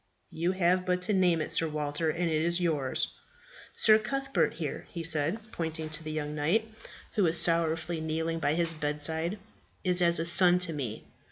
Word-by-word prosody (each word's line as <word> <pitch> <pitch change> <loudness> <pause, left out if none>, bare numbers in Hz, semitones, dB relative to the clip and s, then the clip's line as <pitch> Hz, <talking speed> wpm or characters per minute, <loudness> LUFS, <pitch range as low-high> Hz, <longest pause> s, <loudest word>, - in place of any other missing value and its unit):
"You 170 +3 -1
have 180 0 +1
but 180 0 -1
to 210 - 0
name 180 -4 +2
it, - - -5
Sir 165 - +2
Walter, 150 +1 -2
and 170 +2 -1
it 155 -1 0
is 170 +2 +1
yours." 150 -7 0 0.6
"Sir 215 -1 +5
Cuthbert, 275 +4 -1
here," - - -6
he 170 -3 -6
said, 160 +3 +3
pointing 160 -1 -4
to 155 +1 -4
the 155 - -6
young 150 -1 -4
knight, 165 +10 0 0.5
who 215 - 0
was 170 -2 +3
sorrowfully 165 0 0
kneeling 160 +1 -2
by 150 -1 0
his 170 -1 -1
bedside, 160 +4 -2 0.5
"is 180 -1 +1
as 170 -1 +4
a 165 - 0
son 180 +1 +6
to 180 -2 +2
me. 125 -7 -5
165 Hz, 185 wpm, -28 LUFS, 155-180 Hz, 0.6 s, son